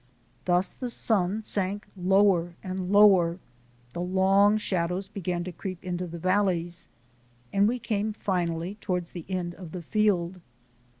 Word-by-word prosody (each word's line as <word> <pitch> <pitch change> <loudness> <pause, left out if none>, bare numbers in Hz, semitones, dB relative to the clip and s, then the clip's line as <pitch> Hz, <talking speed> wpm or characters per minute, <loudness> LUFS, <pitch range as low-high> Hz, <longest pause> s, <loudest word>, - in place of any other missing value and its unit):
Thus 180 +1 +2
the 250 - -5
sun 215 -2 +1
sank 200 0 -2
lower 185 -2 +3
and 185 0 -4
lower, 190 -5 +6 0.6
the 175 - -4
long 195 +3 +4
shadows 185 -2 -1
began 180 -4 -3
to 180 - -5
creep 185 +1 -7
into 180 -1 -3
the 170 0 -7
valleys, 180 -1 0 0.7
and 200 +1 +4
we 245 +3 0
came 215 -2 -1
finally 180 -1 -2
toward 180 -3 -1
the 170 -1 -9
end 180 -2 -2
of 175 -3 -10
the 180 -2 -6
field. 185 -3 +1
185 Hz, 140 wpm, -27 LUFS, 175-200 Hz, 0.7 s, lower